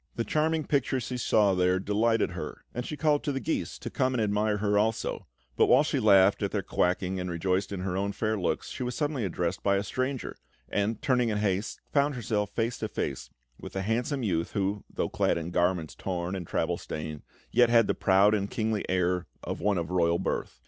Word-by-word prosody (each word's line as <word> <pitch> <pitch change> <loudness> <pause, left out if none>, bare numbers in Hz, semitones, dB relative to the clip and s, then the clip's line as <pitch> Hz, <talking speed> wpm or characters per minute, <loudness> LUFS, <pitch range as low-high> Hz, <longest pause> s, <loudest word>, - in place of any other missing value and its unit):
The 115 - -1
charming 155 +3 0
picture 135 -2 +1
she 125 +1 -4
saw 105 -4 +3
there 90 0 +2
delighted 110 +3 +1
her, - - -7
and 120 +1 -4
she 150 - -5
called 150 -2 +2
to 145 - -1
the 135 - -2
geese 160 - -2
to - - -7
come 130 -2 +1
and 115 - +1
admire 105 0 +1
her 105 0 +1
also; 110 +2 0 0.3
but - - +4
whilst 140 +4 +4
she 140 - +1
laughed 100 -3 +5
at - - 0
their - - -2
quacking 90 +1 0
and 90 0 -3
rejoiced 90 +3 -1
in 95 -2 -4
her 90 -1 -2
own 100 +1 0
fair 110 +1 -1
looks, 90 -4 -2
she - - -7
was 125 -1 -2
suddenly 145 -6 -1
addressed 90 -1 -2
by 100 0 +2
a 100 - 0
stranger, 130 +5 -3 0.3
and, 105 +2 -1
turning 125 -3 +2
in 105 - 0
haste, 105 0 -1
found 145 0 +2
herself 105 -4 -1
face 115 +1 -2
to 110 - -2
face - - -4 0.3
with - - -9
a 95 - -1
handsome 120 +6 -1
youth, 85 -5 -1
who, 100 0 -1
though - - -1
clad - - +1
in 85 +1 -4
garments 90 -2 +1
torn 90 0 -3
and 90 -3 -5
travel - - -1
stained, 75 -1 -6 0.3
yet 120 -1 +5
had 115 -1 +5
the - - +1
proud 100 +2 +4
and 100 -1 0
kingly 110 -2 -1
air 90 -2 +1 0.2
of - - -4
one 100 -2 +2
of 85 0 -3
royal 85 -2 +2
birth. 95 - -3
105 Hz, 220 wpm, -28 LUFS, 95-120 Hz, 0.3 s, laughed